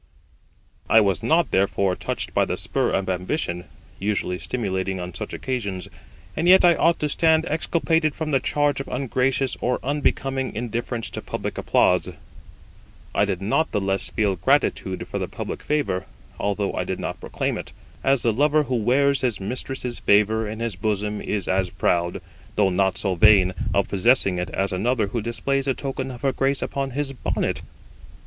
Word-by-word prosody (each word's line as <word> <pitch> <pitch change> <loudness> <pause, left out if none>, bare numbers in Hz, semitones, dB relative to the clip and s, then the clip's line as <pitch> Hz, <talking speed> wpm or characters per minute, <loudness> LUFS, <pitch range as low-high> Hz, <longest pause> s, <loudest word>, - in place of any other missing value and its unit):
I 110 - +7
was 100 -4 +2
not, 165 0 +2
therefore, 95 -1 +2
touched - - -4
by - - +3
the - - -3
spur - - 0
of 95 - -1
ambition, 90 - -2 0.3
usually 95 -3 -1
stimulating 95 -5 -2
on 90 0 -6
such - - -6
occasions; 100 -8 -3 0.5
and 165 - 0
yet 185 0 +7
I 175 - +7
ought 165 +1 +2
to 150 - +1
stand 160 +1 +3
exculpated 160 0 +1
from 155 -1 -3
the 135 - +3
charge 145 +1 +1
of - - -8
ungracious 130 0 0
or 125 +1 +1
unbecoming 135 -2 -1
indifference 120 +1 -3
to - - -5
public - - -4
applause. - - +2 1.0
I 100 - +3
did 95 -2 -3
not 155 +10 +1
the - - +1
less 95 -1 0
feel 105 -3 0
gratitude 95 -3 +1
for - - -4
the - - -2
public - - -6
favour, 95 -12 -1 0.3
although 100 -1 -1
I - - -1
did - - -3
not - - -4
proclaim - - -2
it; - - -7 0.3
as 135 -2 +2
the 115 - +2
lover 150 +5 +3
who 130 -3 -1
wears 135 +5 +2
his 120 -5 0
mistress's 125 +4 -4
favour 105 +1 +3
in 110 +1 -6
his 115 -4 -1
bosom 105 +1 -2
is 100 -4 -2
as 95 -1 +1
proud, 85 0 0 0.3
though 100 -2 +3
not 95 +1 +1
so 95 -3 0
vain, 95 0 +5 0.2
of 100 - +1
possessing 100 -2 +3
it 90 - -3
as 95 0 -1
another 110 +4 +1
who 115 +2 -2
displays 135 +4 -1
the 135 -2 +1
token 135 -1 -4
of 125 0 -9
her 135 - +3
grace 135 0 0
upon 135 -1 -2
his 145 -2 -1
bonnet. 130 - -2
115 Hz, 175 wpm, -23 LUFS, 95-135 Hz, 1.0 s, I